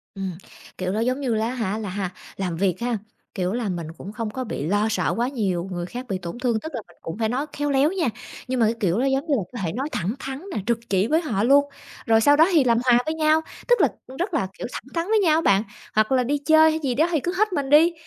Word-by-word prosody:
Ừm, 190 -1 -3 0.5
kiểu, 185 0 -2
nó, 210 - -1
giống 255 +4 0
như 245 -5 0
lá 220 +1 0
hả, 225 -5 -2
là 215 -3 -4
ha 190 -1 -3 0.3
làm 180 -4 -2
việc 190 +1 +1
ha, 240 -1 -1 0.4
kiểu 185 +1 -1
là 235 -4 -2
mình 170 -3 -4
cũng 195 - -8
không 225 -1 -3
có 255 +4 -4
bị 215 - -4
lo 205 +3 +2
sợ - - 0
quá 240 - +1
nhiều 190 -8 -1
người 175 -1 -3
khác 245 +7 -7
bị 190 - -1
tổn 175 +5 -7
thương, 240 -3 +1
tức 315 - -7
là - - -3
mình - - -21
cũng 165 +5 -6
phải 220 -1 0
nói 265 +5 -1
khéo 290 0 -1
léo 280 +4 +3
nha, 360 -8 0 0.4
nhưng 255 -1 -1
mà 225 - +5
cái 225 +2 +1
kiểu 185 0 +1
nó, 255 - +1
giống 270 +2 +1
như 300 - +1
là, 205 - -1
có 240 - -5
thể 165 - -1
nói 270 +5 -3
thẳng 190 +6 -1
thắn 270 +2 -5
nè, - - -1
trực 235 -1 +1
chỉ 195 +2 +2
với 320 +4 +2
họ 220 - -1
luôn, 280 +4 +5 0.4
rồi 225 0 +4
sau 290 +5 +6
đó 320 +2 +6
thì 310 -6 +5
làm 235 -2 +3
hòa 245 -1 +6
với 315 - -1
nhau. 310 0 +3 0.3
Tức 485 -1 +4
là, - - +6 0.2
ừm, 260 +1 -10
rất 365 +2 -2
là, 190 - +1
kiểu, - - -4
thẳng - - -6
thắn 335 +2 -1
với 435 0 +3
nhau 325 -4 +3
bạn, 200 -3 +3 0.3
hoặc 215 +2 +3
là 255 -1 +3
đi 290 +4 0
chơi 315 +2 +5
hay 315 - -1
gì 255 -3 0
đó 315 +5 +3
thì 315 - +2
cứ 350 +6 -2
hết 425 -2 +2
mình 280 -4 -1
đi, 320 +4 +6
245 Hz, 290 wpm, -23 LUFS, 205-290 Hz, 0.5 s, sau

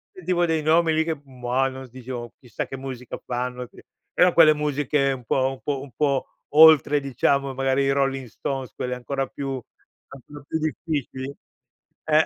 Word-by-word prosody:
sentivo 180 -1 0
dei 160 -1 0
nomi 160 +1 +3
lì 160 0 +2
che 160 -3 -3
mah 130 0 -1
non 130 0 -8
s 125 - -21
diceva: 125 -1 -7
"Chissà 125 -4 -5
che 135 - -7
musica 130 -2 -7
fanno 125 0 -3
'sti" - - -17 0.3
però 180 -1 +5
quelle 160 -2 +8
musiche 145 -1 0
un 125 -2 -6
po' 130 +3 +1
un 135 - -10
po' 140 -2 -2
un 135 -4 -11
po' 140 +1 0 0.3
oltre 155 -2 +7
diciamo 140 0 0
magari 135 +1 +1
i 135 - +2
Rolling 135 -2 0
stones, 135 +3 -5
quelle 125 0 -3
ancora 135 +2 -3
più 135 -2 -5 0.5
ancora 140 +2 -12
più 160 - -2
difficili. 145 -4 -3 0.7
Eh, 155 0 +4
135 Hz, 175 wpm, -24 LUFS, 130-150 Hz, 0.7 s, quelle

